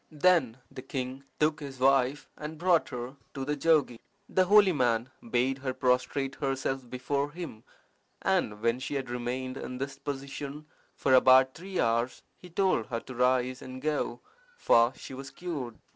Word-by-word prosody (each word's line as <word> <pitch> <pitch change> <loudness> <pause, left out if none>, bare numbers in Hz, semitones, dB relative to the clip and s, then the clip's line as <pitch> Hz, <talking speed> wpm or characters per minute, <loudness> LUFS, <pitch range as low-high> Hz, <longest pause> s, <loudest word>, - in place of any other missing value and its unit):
Then 150 -7 +3
the - - -8
king 130 +1 -5
took 150 0 +2
his 140 -3 -8
wife 135 +2 +3
and 155 +1 -7
brought 175 0 +3
her 125 +2 -6 0.2
to 135 -1 -3
the 150 +1 -1
jogi. 145 -6 +2 0.3
The 185 - +2
holy 205 0 +6
man 120 -4 +1 0.2
bade 130 +3 +1
her 130 -1 -3
prostrate 130 +2 +1
herself 135 -2 -2
before 140 +3 -1
him, 160 -8 -8 0.6
and 105 +1 0
when 115 +1 +2
she 135 - -4
had 135 -3 -3
remained 125 +2 -3
in 125 - -6
this 135 +2 -5
position 140 +1 -6 0.3
for 130 - +1
about 130 0 +7
three 185 +2 -5
hours, 115 +2 +1
he 180 - -14
told 175 - +1
her 115 -1 -3
to 130 - -9
rise 125 +1 +1
and 130 0 -8
go, 145 -4 -2 0.4
for 115 - +5
she - - -9
was 135 +1 -7
cured. 140 -6 -5
135 Hz, 165 wpm, -29 LUFS, 125-145 Hz, 0.6 s, about